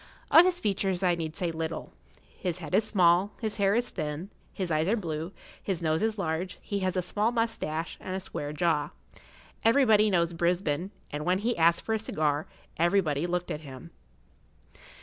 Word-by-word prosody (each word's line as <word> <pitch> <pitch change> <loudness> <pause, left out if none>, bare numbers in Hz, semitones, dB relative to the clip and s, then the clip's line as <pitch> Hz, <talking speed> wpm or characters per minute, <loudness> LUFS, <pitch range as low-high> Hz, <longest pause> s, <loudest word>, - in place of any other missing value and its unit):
Of 335 - +9
his 365 -1 +1
features 195 - 0
I 180 -1 +4
need 160 -2 -4
say 175 -2 -1
little. 160 0 -4 0.3
His 180 -2 -4
head 175 - -8
is 220 - +4
small, 185 -1 +3
his 220 -2 -2
hair 200 0 +3
is 240 +1 0
thin, 155 +6 -4 0.2
his 185 -4 -3
eyes 155 +1 +1
are 215 - +3
blue, 165 -3 -4 0.3
his 190 -4 -2
nose 160 -2 0
is 220 0 0
large, 175 0 -2
he 200 - -3
has 185 -1 -1
a 180 - +1
small 210 +5 0
moustache, 225 -9 -2
and 185 - -4
a - - -1
square 145 -5 -5
jaw. 150 -1 +1 0.7
Everybody 220 -3 +5
knows 170 -3 +2
Brisbane, 170 0 0 0.2
and 150 +1 -3
when 180 +3 +2
he 230 +5 0
asked 170 +1 +3
for 220 - 0
a 220 - +1
cigar 155 -7 -1 0.3
everybody 170 -3 +2
looked 180 0 -2
at 150 - -4
him. 140 +3 -10
180 Hz, 185 wpm, -28 LUFS, 160-205 Hz, 0.7 s, Of